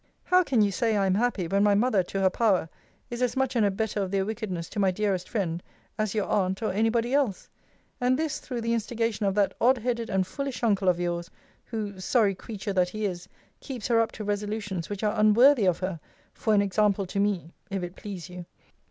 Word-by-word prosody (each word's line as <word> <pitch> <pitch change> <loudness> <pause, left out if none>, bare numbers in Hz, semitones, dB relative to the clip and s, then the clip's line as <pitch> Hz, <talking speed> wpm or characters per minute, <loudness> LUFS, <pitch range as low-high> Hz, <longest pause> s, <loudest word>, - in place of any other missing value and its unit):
How 365 0 +4
can 260 -11 +2
you 200 - +2
say 225 0 +1
I 195 - +2
am 190 - +2
happy, 210 -4 0
when 195 +4 +1
my 205 -1 +4
mother, 215 -2 +3
to 195 +2 -4
her 190 - +5
power, 190 -7 +2 0.4
is 240 +1 -4
as 250 +1 0
much 265 -1 0
an 230 - +3
abettor 205 +1 0
of 190 - -2
their 195 0 0
wickedness 205 -6 -4
to - - -5
my 195 -1 +4
dearest 190 -1 -1
friend, 175 -7 -2 0.3
as 215 -1 -2
your 210 - +1
aunt, 190 +1 0
or 215 - 0
any 220 +3 +2
body 235 +2 0
else? 270 -9 0 0.5
and 250 0 +2
this 315 -1 -2
through 245 -3 -5
the 230 0 0
instigation 230 -2 -1
of 195 - 0
that 200 -2 +2
odd 255 +3 +5
headed 235 -1 -2
and 190 -1 +1
foolish 275 +4 -5
uncle 200 -4 +3
of 175 -1 +1
yours, 175 0 -2 0.4
who 210 -4 -5
[sorry 205 +1 +2
creature 205 +1 -6
that 180 -1 +2
he 215 +3 -3
is!] 180 -1 -4 0.3
keeps 250 -6 -6
her 230 -1 +4
up 225 - -1
to 215 - -6
resolutions 205 -3 -3
which 205 0 -5
are 210 - +2
unworthy 225 +3 +6
of 175 -2 +3
her, 185 -3 -3 0.3
for 220 - +1
an 200 - +4
example 200 0 +1
to 190 +2 -3
me, 195 -5 0 0.2
if 195 -2 -3
it 175 +1 -6
please 190 -6 -7
you. 180 -1 -9
205 Hz, 225 wpm, -27 LUFS, 190-230 Hz, 0.5 s, unworthy